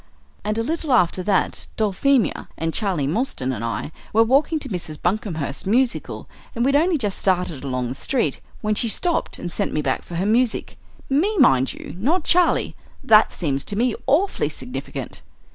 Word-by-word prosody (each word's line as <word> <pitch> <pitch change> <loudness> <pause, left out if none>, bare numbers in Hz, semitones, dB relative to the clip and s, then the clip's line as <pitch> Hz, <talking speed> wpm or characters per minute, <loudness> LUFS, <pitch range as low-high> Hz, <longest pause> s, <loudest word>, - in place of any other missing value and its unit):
"And 210 +1 -1
a 225 - +1
little 315 +1 -1
after 185 -5 +3
that 195 +1 0
Dulphemia 220 +4 +1
and 165 0 -2
Charlie 190 -10 0
Mostyn 145 - -1
and 115 -2 -5
I 115 +6 -3 0.2
were 225 +2 +6
walking 275 +7 +2
to 300 - -5
Mrs. 170 -6 -4
Buncomhearst's 175 -7 -2
musical, 245 +4 0 0.3
and 235 +1 +1
we'd 275 +1 +3
only 330 +3 +3
just 205 -7 -2
started 180 -7 0
along 125 -3 -2
the - - -3
street, 240 - -1 0.2
when 215 -1 0
she 230 +2 0
stopped 345 - 0
and 175 - -5
sent - - -2
me 150 - 0
back - - 0
for 175 - -9
her 180 +3 0
music 235 +2 +1 0.3
me, 360 +11 +1
mind 135 - +4
you, - - -9
not 310 - +1
Charlie. 355 +2 +3 0.3
That 215 -1 +6
seems 140 -5 -1
to 205 - -3
me 240 +2 +1
awfully 335 +9 +2
significant." - - -6
215 Hz, 180 wpm, -22 LUFS, 165-270 Hz, 0.3 s, were